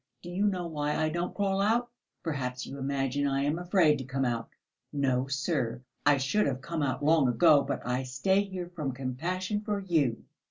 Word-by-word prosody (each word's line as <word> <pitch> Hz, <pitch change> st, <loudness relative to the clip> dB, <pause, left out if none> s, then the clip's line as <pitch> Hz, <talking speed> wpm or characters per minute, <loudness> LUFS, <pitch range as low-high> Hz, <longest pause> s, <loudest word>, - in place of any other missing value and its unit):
Do 175 Hz, -, -7 dB
you 195 Hz, +4 st, +1 dB
know 185 Hz, -3 st, -1 dB
why 150 Hz, -2 st, -2 dB
I 155 Hz, 0 st, +1 dB
don't 175 Hz, +3 st, -3 dB
crawl 195 Hz, -1 st, +1 dB
out? 235 Hz, +4 st, +2 dB, 0.3 s
Perhaps 125 Hz, -5 st, -3 dB
you 140 Hz, -, -7 dB
imagine 135 Hz, +1 st, 0 dB
I 135 Hz, 0 st, +1 dB
am 150 Hz, +4 st, 0 dB
afraid 175 Hz, -5 st, +3 dB
to -, -, -4 dB
come 135 Hz, +1 st, -1 dB
out? 120 Hz, -2 st, -2 dB, 0.4 s
No, 135 Hz, -3 st, +1 dB
sir, 135 Hz, -3 st, -1 dB, 0.2 s
I 145 Hz, -1 st, +6 dB
should 135 Hz, +10 st, +1 dB
have 130 Hz, -2 st, -1 dB
come 165 Hz, +3 st, -4 dB
out 140 Hz, 0 st, -1 dB
long 155 Hz, -3 st, +5 dB
ago, 145 Hz, +4 st, +5 dB
but 140 Hz, +1 st, -4 dB
I 125 Hz, +1 st, 0 dB
stay 130 Hz, +10 st, +1 dB
here 185 Hz, -3 st, -6 dB
from 145 Hz, -6 st, -2 dB
compassion 175 Hz, -, -2 dB
for 210 Hz, -1 st, -2 dB
you. 160 Hz, -11 st, +1 dB
145 Hz, 195 wpm, -29 LUFS, 135-180 Hz, 0.4 s, I